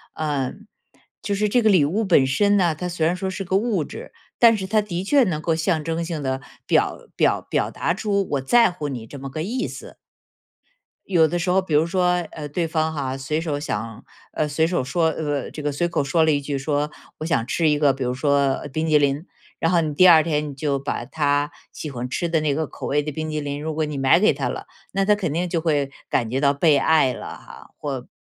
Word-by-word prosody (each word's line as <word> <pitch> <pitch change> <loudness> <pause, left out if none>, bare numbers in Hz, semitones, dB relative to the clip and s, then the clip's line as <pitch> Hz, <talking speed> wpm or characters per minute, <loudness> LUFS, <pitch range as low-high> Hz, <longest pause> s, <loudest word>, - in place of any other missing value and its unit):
嗯， 150 - -3 0.5
就 200 - -2
是 210 +1 +1
这 245 +3 +3
个 220 - +4
礼 180 -8 +5
物 200 +9 0
本 170 -9 +4
身 205 +10 +2
呢， 175 -4 +3
它 180 +4 -5
虽 170 -2 -1
然 170 - +2
说 190 +1 -3
是 195 +1 -4
个 190 +1 +1
物 205 -6 0
质， - - -9 0.3
但 230 -2 +6
是 190 - -4
它 215 +1 +2
的 180 -3 -4
确 280 +8 +4
能 165 -7 -1
够 165 - +1
象 160 -1 0
征 165 +1 -2
性 160 -4 -4
地 130 0 -2 0.2
表 - - +2 0.2
表 - - +2
表 - - -1
达 170 - -1
出 200 -1 -1
我 140 -2 0
在 230 - +4
乎 155 -4 -5
你 120 -5 -6
这 140 +5 -10
么 135 0 -6
个 155 +4 -4
意 250 +7 -2
思。 - - -10 1.1
有 170 -4 +4
的 175 +3 -2
时 175 +1 -1
候 190 +1 +3
比 170 -5 -5
如 155 +2 +4
说， 180 0 +1 0.2
呃， 150 -2 -6
对 165 +2 -1
方 160 0 0
哈， 135 -3 -3
随 135 +3 -2
手 155 -3 -2
想 115 -6 -5 0.3
呃， 155 - 0
随 150 +2 +1
手 170 -4 0
说 160 +6 +1
呃， 145 -4 -3
这 150 - -7
个 145 - -1
随 170 +5 0
口 160 - -1
说 160 +4 +2
了 160 - +3
一 145 -1 +1
句 140 0 -3
说： 145 +2 -1 0.3
“我 155 - -4
想 160 -8 0
吃 155 +4 +1
一 150 - +2
个， 145 -2 +3
比 135 - -4
如 125 0 -1
说 140 0 +1
冰 160 +1 -1
淇 155 - +5
淋。” 145 +2 +1 0.3
然 165 - +1
后 170 -2 +4
你 155 -2 -2
第 185 +5 +6
二 160 -3 +8
天 150 -2 -1
你 - - -7
就 140 0 -1
把 140 - -3
他 145 -1 0 0.2
喜 155 - -6
欢 125 0 -5
吃 170 +6 -1
的 165 -2 +1
那 150 -2 +1
个 155 -2 -1
口 - - -7
味 145 +1 +1
的 150 - -4
冰 155 +2 -4
淇 155 - -2
淋， 145 0 -4
如 155 0 -3
果 155 0 0
你 145 -2 -4
买 135 +5 +5
给 210 - +4
他 - - -2
了， - - -5 0.3
那 195 0 +1
他 210 - +5
肯 195 -7 -2
定 170 +4 -1
就 165 -2 -1
会 145 -4 0 0.2
感 115 -3 0
觉 135 +3 -1
到 140 0 +4
被 150 +1 +4
爱 140 -3 +3
了 - - -8
哈， - - -14
或 135 -4 -5
155 Hz, 265 characters per minute, -22 LUFS, 145-175 Hz, 1.1 s, 二